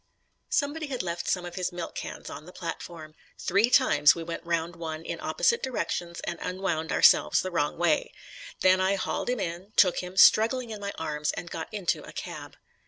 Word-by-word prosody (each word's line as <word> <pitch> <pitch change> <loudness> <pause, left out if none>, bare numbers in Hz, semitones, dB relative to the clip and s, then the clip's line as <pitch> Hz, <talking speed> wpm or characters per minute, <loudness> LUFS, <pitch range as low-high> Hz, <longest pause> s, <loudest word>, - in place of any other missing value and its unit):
Somebody 300 +2 -1
had 255 -7 -3
left 170 -1 -4
some 180 -2 0
of 175 - -7
his 180 0 -2
milk 175 -1 -6
cans - - -7
on 155 - -8
the - - -10
platform. 165 -2 -7 0.2
Three 200 +6 +2
times 150 - +5
we 170 - -5
went 165 0 -6
round 170 0 -2
one 160 -1 -6
in - - -4
opposite 470 - +1
directions 175 -8 -3
and 170 - -4
unwound 180 -4 -2
ourselves 75 - +5
the 185 - -4
wrong 145 -4 0
way. 170 -2 +1 0.5
Then 185 0 +5
I 190 +1 +2
hauled 195 - -2
him 250 -2 0
in, 180 +3 -5
took 180 -3 +5
him, 180 +1 -7
struggling, 230 +4 +5
in 215 - -6
my 200 0 -3
arms 150 -1 -2
and 170 - -7
got 160 - -5
into 200 -5 -1
a - - -11
cab. - - -7
175 Hz, 195 wpm, -27 LUFS, 165-200 Hz, 0.5 s, times